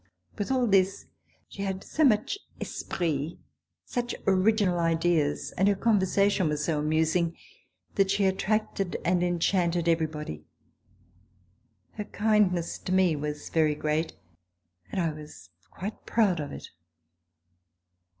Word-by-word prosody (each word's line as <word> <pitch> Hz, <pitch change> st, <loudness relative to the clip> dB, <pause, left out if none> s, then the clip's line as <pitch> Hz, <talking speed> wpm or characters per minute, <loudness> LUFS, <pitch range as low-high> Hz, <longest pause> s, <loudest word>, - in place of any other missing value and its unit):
With 205 Hz, -, -3 dB
all 255 Hz, -2 st, +2 dB
this, 195 Hz, -, +2 dB, 0.4 s
she 195 Hz, -, -9 dB
had 190 Hz, -1 st, -3 dB
so 315 Hz, -, 0 dB
much 240 Hz, -, +3 dB, 0.2 s
esprit, 160 Hz, -2 st, -3 dB, 0.5 s
such 240 Hz, 0 st, -3 dB
original 195 Hz, -1 st, +3 dB
ideas, 165 Hz, -3 st, +1 dB
and 190 Hz, -, +1 dB
her 205 Hz, -, +4 dB
conversation 200 Hz, -4 st, +2 dB
was 150 Hz, 0 st, -1 dB
so 160 Hz, -3 st, 0 dB
amusing 160 Hz, +3 st, +1 dB, 0.6 s
that 195 Hz, -1 st, +2 dB
she 200 Hz, 0 st, +2 dB
attracted 195 Hz, -1 st, 0 dB
and 180 Hz, 0 st, +2 dB
enchanted 175 Hz, -1 st, +1 dB
everybody. 155 Hz, -, -1 dB, 1.5 s
Her 210 Hz, -, -6 dB
kind 210 Hz, -2 st, +3 dB
ness 170 Hz, -2 st, -3 dB
to -, -, -5 dB
me 185 Hz, -3 st, +4 dB
was 150 Hz, 0 st, -4 dB
very 155 Hz, -2 st, +2 dB
great 155 Hz, +2 st, -1 dB, 0.8 s
and -, -, -2 dB
I 165 Hz, -3 st, +1 dB
was 150 Hz, -11 st, -12 dB, 0.2 s
quite 205 Hz, +4 st, -7 dB
proud 200 Hz, -7 st, +2 dB
of 145 Hz, -, -4 dB
it. -, -, -9 dB
180 Hz, 125 wpm, -28 LUFS, 160-200 Hz, 1.5 s, her